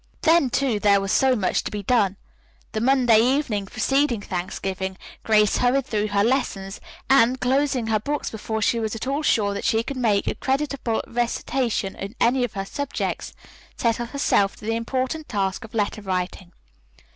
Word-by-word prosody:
Then, 325 -4 +4
too, 245 -4 0
there 205 -1 +4
was 195 0 -2
so 265 -1 +4
much 200 -5 0
to - - -3
be 205 -1 -5
done. 200 -3 +2 0.5
The 215 - -2
Monday 245 -3 +4
evening 240 -5 +1
preceding 270 +4 +1
Thanksgiving 190 0 -4 0.2
Grace 210 -2 +3
hurried 250 +2 +2
through 215 -4 -1
her 205 -1 +1
lessons 215 -6 -1 0.3
and, 260 -1 +4
closing 265 -1 +1
her 220 -1 +1
books 290 +7 -3
before 220 0 -3
she 235 - +2
was 220 -1 -2
at 225 - -5
all 275 +3 -1
sure 205 -8 +2
that 200 - -5
she 225 +1 +2
could 275 +2 -5
make 215 -5 +2
a - - +1
creditable 270 -4 -1
recitation 240 -3 -1
in 200 +4 -7
any 250 +2 +3
of 245 - -3
her 195 -1 -4
subjects, 285 +6 -4 0.4
settled 235 0 0
herself 225 -7 +1
to - - -13
the 225 +1 0
important 260 +6 -3
task 195 -2 -1
of 220 +1 -11
letter 210 0 -1
writing. 185 -1 -3
225 Hz, 175 wpm, -23 LUFS, 205-260 Hz, 0.5 s, Then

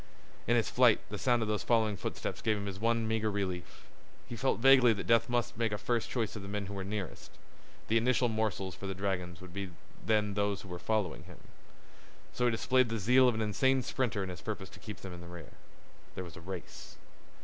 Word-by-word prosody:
In 120 - +4
his 115 - +2
flight 125 -4 +5
the 105 - -5
sound 120 -3 +2
of - - -2
these 105 -1 0
following 110 -3 +2
footsteps 95 - -4
gave 110 -1 +1
him 100 - -4
his 95 -2 -5
one 115 0 +1
meager 110 -1 0
relief. 95 -4 -4 0.4
He 120 - -6
felt 130 +3 +1
vaguely 130 -1 +7
that 100 - -5
death 115 0 +4
must 120 -2 -1
make 115 -2 +1
a 105 - -1
first 120 +1 -1
choice 115 -4 -2
of 105 - -5
the 95 - -8
men 100 0 -3
who 100 - -7
were 95 -1 -4
nearest; 100 -1 -5 0.6
the 115 +1 +4
initial 125 +1 +2
morsels 110 -4 -1
for 100 - -7
the 95 - -3
dragons 90 -2 -3
would 90 -1 -11
be 100 -1 -4 0.3
then 105 -2 +2
those 100 -1 0
who 95 - -11
were 90 -1 -5
following 100 -4 -1
him. 90 -1 -12 1.0
So 125 - 0
he 120 - +4
displayed 130 +2 +2
the 115 - -1
zeal 125 +5 +5
of 120 - -1
an 110 - 0
insane 130 +5 +2
sprinter 115 -6 -1
in 95 - -4
his 90 -1 -7
purpose 100 -3 -5
to - - -14
keep 105 - -8
them 95 -2 -7
in 85 - -9
the 85 - -10
rear. 85 -4 -10 0.6
There 95 - -4
was 85 -3 -10
a - - -10
race. 90 0 -8
105 Hz, 230 wpm, -32 LUFS, 95-115 Hz, 1.0 s, vaguely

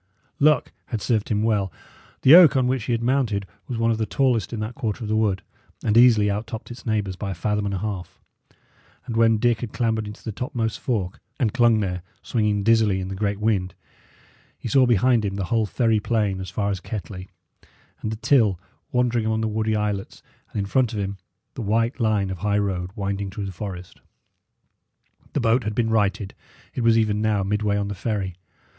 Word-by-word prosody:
Luck 150 -2 +3 0.2
had 115 - -3
served 110 -1 0
him 105 -1 +1
well. 105 -4 +1 0.5
The 135 - +8
oak 165 -5 +9
on 130 - +3
which 125 -2 0
he - - -2
had 115 0 0
mounted 120 -6 +1 0.2
was 120 - -4
one 115 0 +2
of 110 - -1
the 110 - -1
tallest 125 -2 +1
in 115 - -4
that 110 +2 -4
quarter 120 -2 -3
of - - -4
the 110 - 0
wood, 100 -3 +1 0.4
and 105 - +2
easily 115 -3 +6
out 105 +2 -2
topped 110 +2 -7
its 120 +1 -10
neighbours 105 -4 -1
by 100 +1 -5
a - - -2
fathom 105 +4 -1
and 100 - -2
a 95 - -3
half; 95 -4 -5 0.9
and 120 -3 -5
when 115 -1 +4
Dick 115 0 +1
had 120 -4 -5
clambered 110 -2 0
into 105 - -10
the 110 - -4
topmost 115 0 -3
fork 100 -7 -2 0.2
and 120 -5 +1
clung 120 -3 +4
there, 90 -3 -2 0.2
swinging 105 -3 0
dizzily 110 -3 +3
in 95 0 -4
the 95 - -4
great 100 0 -1
wind, 100 -5 0 0.8
he - - -6
saw 130 +2 +4
behind 120 +1 +3
him 100 -1 -2
the 100 -1 -2
whole 110 -2 +2
fenny 115 0 +2
plain 105 -3 0
as 95 - -6
far 100 +2 -1
as 95 - -3
Kettley, 100 -4 -6 0.7
and 110 - -3
the - - -2
Till 115 -6 +3 0.3
wandering 120 -2 +1
among 110 0 0
woody 110 0 0
islets, 105 -2 -3 0.3
and - - -7
in 100 - 0
front 125 +3 +1
of 105 - -3
him, 100 0 -3 0.3
the - - -6
white 115 +4 0
line 105 -4 +1
of 95 - -5
high 105 +2 +1
road 95 -3 -1
winding 100 -1 -3
through 100 +1 -5
the 95 - -5
forest. 90 -1 -8 1.3
The - - +1
boat 115 0 +2
had 105 0 -3
been 115 -1 +1
righted 100 -2 0 0.4
it - - -3
was 115 -1 +4
even 105 -2 +1
now 105 -2 +1
midway 105 +1 0
on 100 0 -1
the 100 - -3
ferry. 95 -2 -3
110 Hz, 210 wpm, -23 LUFS, 100-115 Hz, 1.3 s, oak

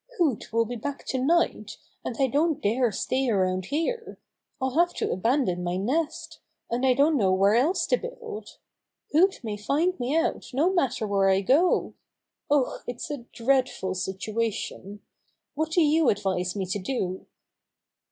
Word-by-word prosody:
Hoot 295 - 0
will 230 0 +2
be 240 +2 -5
back 285 +5 -5
tonight, 285 +7 0 0.3
and 235 - -4
I 270 - +4
don't 295 +4 +1
dare 235 +3 +1
stay 260 +5 -1
around 185 -3 +1
here. 330 - -2 0.4
I'll 260 -1 -1
have 345 +4 +2
to - - -1
abandon 190 -3 +1
my 175 +1 -1
nest, 305 - -2 0.3
and 240 +2 -1
I 255 - +4
don't 290 +3 +3
know 190 -3 +3
where 195 +2 +4
else 300 - +2
to - - +2
build. 475 -3 -8 0.5
Hoot 360 +1 +3
may 215 -2 -4
find 300 - 0
me 255 +6 0
out 330 +2 -1
no 320 +9 +2
matter 260 -10 0
where 195 -1 +2
I 190 0 +3
go. 295 - +2 0.6
Oh, 285 -3 +2
it's 245 +5 -5
a 270 -5 -6
dreadful 250 -6 0
situation! 205 +1 -3 0.5
What 315 +1 -1
do 340 +2 +2
you 310 -1 +4
advise 185 -2 -1
me 195 -2 -2
to 190 +3 -2
do?" 185 -3 -3
255 Hz, 160 wpm, -26 LUFS, 205-315 Hz, 0.6 s, I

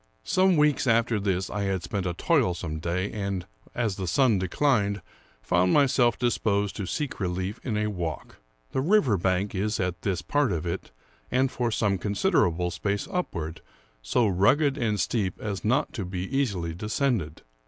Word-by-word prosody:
Some 185 -2 +3
weeks 150 -3 +3
after 115 -1 +3
this 95 -2 0
I 105 - -2
had 95 -2 -1
spent 100 -3 -2
a 85 - -2
toilsome 90 - 0
day, 90 +5 -2
and, 100 -3 -3 0.3
as 110 -5 -1
the 95 -2 -3
sun 115 0 +3
declined, 100 - +1 0.4
found 90 +8 +2
myself 130 -4 +4
disposed 105 -4 0
to 100 -4 -3
seek 145 - -3
relief 95 +2 -2
in 110 -5 -1
a 105 - 0
walk. 90 -7 -4 0.3
The 130 - 0
river 155 - +3
bank 95 +2 0
is, 105 +2 -1
at 90 -1 -2
this 95 -4 -1
part 145 -6 +1
of 85 -1 -2
it 85 - -4 0.4
and 130 +1 +2
for 120 -1 -1
some 105 -4 0
considerable 90 -4 +1
space 100 +3 -2
upward, 85 - -3 0.4
so 85 - +2
rugged 130 - +3
and 110 -7 -1
steep 95 0 -1
as 100 -3 -4
not 120 +6 +1
to 105 - -3
be 90 0 -4
easily 95 -12 0
descended. 105 - -1
100 Hz, 165 wpm, -26 LUFS, 90-120 Hz, 0.4 s, myself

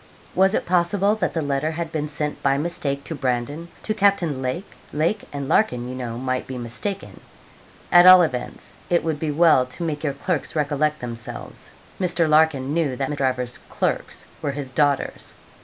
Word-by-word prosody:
Was 190 +2 +3
it - - -1
possible 185 +3 +2
that 210 -6 -2
the 160 - 0
letter 140 +2 0
had 165 0 -4
been 150 -2 -2
sent 150 0 -3
by 135 0 +2
mistake 140 -3 -2
to - - -5
Brandon 135 +4 -2 0.2
to 215 - 0
Captain 195 -9 +2
Lake? 130 +9 -2 0.3
Lake 165 +8 0
and 140 -1 -4
Larkin, 125 -2 +2
you 125 - -5
know, 120 -2 -5
might 130 0 -2
be 130 - -5
mistaken. 125 - -4 0.7
At 175 0 +8
all 185 -1 +10
events, 125 -6 -4
it 175 -2 +2
would 160 -2 -2
be 155 - -2
well 150 -4 +4
to 130 +7 -7
make 155 -2 -3
your 145 -3 0
clerks 150 +3 -3
recollect 150 0 0
themselves. 120 0 -8 0.3
(Mr. 175 -3 +1
Larkin 150 -3 +3
knew 155 -6 0
that 135 +3 -2
Driver's 125 -3 -1
'clerks' - - -2 0.2
were 140 - -2
his 135 -2 -5
daughters.) 145 +1 0
150 Hz, 175 wpm, -23 LUFS, 130-170 Hz, 0.7 s, all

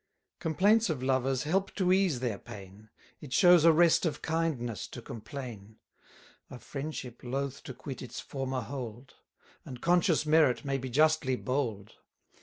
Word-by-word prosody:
Complaints 205 +7 +3
of 140 -5 -2
lovers 130 0 +1
help 190 +6 -1
to 185 -2 +1
ease 185 -10 +2
their 115 -6 -2
pain; 105 -1 -12 0.3
It 140 -3 -9
shows 175 +2 +6
a 165 - +8
rest 165 +1 +4
of 165 -4 -2
kindness 155 - -2
to - - -9
complain; 110 -3 -8 0.7
A - - -9
friendship 135 -2 -7
loath 135 +2 -3
to 130 - -6
quit 135 -3 -8
its 125 -3 -7
former 135 -1 -4
hold; 125 0 -7 0.5
And 125 - -9
conscious 170 0 +2
merit 150 -4 +3
may 135 -1 -1
be 130 0 -5
justly 155 0 +3
bold. 125 -6 -3
135 Hz, 150 wpm, -30 LUFS, 125-160 Hz, 0.7 s, a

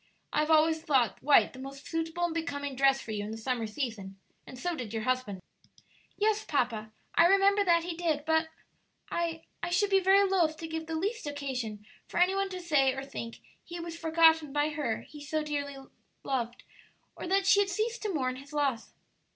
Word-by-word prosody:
I - - +2
have 305 +1 +1
always 320 0 +4
thought 265 - +1
white 295 - +5
the 260 - -11
most 275 +1 -9
suitable 325 +1 -2
and 340 - -2
becoming 285 -4 -3
dress 270 +1 +4
for 225 - -7
you 205 -1 -2
in 205 - -5
the 220 - -5
summer 230 0 -2
season, 215 -5 -5 0.3
and 255 - -10
so 350 +6 -2
did 235 -7 -6
your 220 - -2
husband." 255 -7 -2 0.7
"Yes, 430 0 +1
papa, 230 -6 -1 0.2
I 335 - +6
remember 395 +2 +4
that 340 -3 +3
he 345 -1 -4
did; 320 -4 -1
but 320 0 +2 0.6
I 330 -1 -2 0.2
I 350 - -2
should 390 +3 +1
be 390 - +6
very 390 +1 +5
loath 340 -5 +2
to 325 - -6
give 320 0 -5
the 325 - -3
least 400 +2 -2
occasion 255 -8 -4 0.2
for - - -3
any 365 +2 +4
one 390 0 0
to 370 -1 -5
say 275 -6 +3
or 270 - -4
think 235 -4 -7 0.2
he 345 0 -7
was 335 0 -6
forgotten 320 -2 +4
by 295 +1 +1
her 295 -8 -2
he 295 - -13
loved 290 - -10
so 310 -1 0
dearly, 285 -2 -3 0.5
or 250 +5 -6
that 390 +1 +2
she 400 +1 +6
had 400 -1 +2
ceased 445 +5 -2
to 425 - -2
mourn 255 -6 -1
his 280 +3 -12
loss." 275 -6 -1
310 Hz, 205 wpm, -30 LUFS, 265-345 Hz, 0.7 s, I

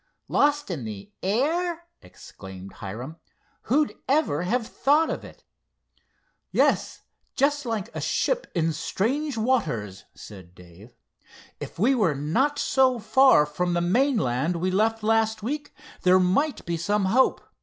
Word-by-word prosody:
"Lost 290 -5 +1
in 150 -8 -4
the 110 - -8
air!" 325 - 0 0.2
exclaimed 95 0 -12
Hiram—"who'd 155 - -4 0.2
ever 275 - +2
have 225 +6 -1
thought 295 +7 +2
of - - -5
it!" - - -14 1.1
"Yes, - - +1 0.3
just 285 0 +1
like 220 -4 -4
a - - -3
ship - - 0
in 165 -1 +1
strange 255 - -2
waters," 155 - -1
said 95 -4 -13
Dave. 90 +6 -16 0.6
"If - - -8
we 230 +10 +3
were 195 - +1
not 235 - 0
so 260 -2 +2
far 225 - +5
from 175 +4 -2
the - - +2
mainland 175 - +1
we 180 +2 -1
left 220 +3 +1
last 220 -1 +1
week, 290 +6 -4 0.3
there 185 +1 +5
might 190 +12 0
be 170 -1 -2
some 205 +4 0
hope. 245 +8 +3
210 Hz, 135 wpm, -25 LUFS, -, 1.1 s, far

